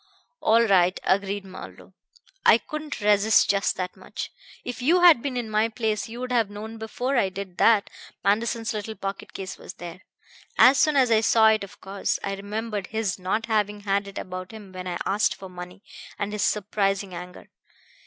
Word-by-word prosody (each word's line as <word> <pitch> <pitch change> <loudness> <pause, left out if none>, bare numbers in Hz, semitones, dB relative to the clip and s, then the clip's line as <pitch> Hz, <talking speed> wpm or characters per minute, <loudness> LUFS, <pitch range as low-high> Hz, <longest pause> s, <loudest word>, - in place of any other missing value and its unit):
"All 230 +1 +4
right," 185 -4 +3
agreed 200 +1 0
Marlowe. 185 0 -11 0.5
"I - - +7
couldn't 305 -4 -6
resist 210 +1 +4
just 200 0 0
that 180 -1 -4
much. - - -7 0.3
If 245 0 -5
you 340 +8 +4
had 340 -9 +7
been 265 -2 -3
in 240 -2 -2
my 215 +1 +1
place 220 -1 -2
you 235 +2 -8
would 255 0 -4
have 230 -4 +2
known 220 +2 -8
before 245 +4 -2
I 195 -5 +3
did 190 -1 -8
that 220 -3 +5 0.4
Manderson's 225 +3 0
little 215 +1 -5
pocket 195 0 -6
case 190 -1 -7
was - - -9
there. 175 +1 -9 0.6
As 265 +2 +7
soon 305 -1 +3
as 255 -4 +4
I 220 -1 +5
saw 220 0 +5
it, 215 -1 +2
of 200 +1 -11
course, 195 +1 -2
I 195 - -2
remembered 205 +1 -4
his 220 -3 -2
not 190 +5 -1
having 210 -2 0
had 200 0 0
it 200 - -9
about 185 0 -6
him 215 -4 -11
when 185 0 -7
I 175 -1 -2
asked 205 +2 +1
for 190 - -10
money, 180 +2 -10 0.3
and 205 +1 -3
his 210 - -2
surprising 200 -2 0
anger. 180 +1 -9
210 Hz, 190 wpm, -25 LUFS, 195-225 Hz, 0.6 s, I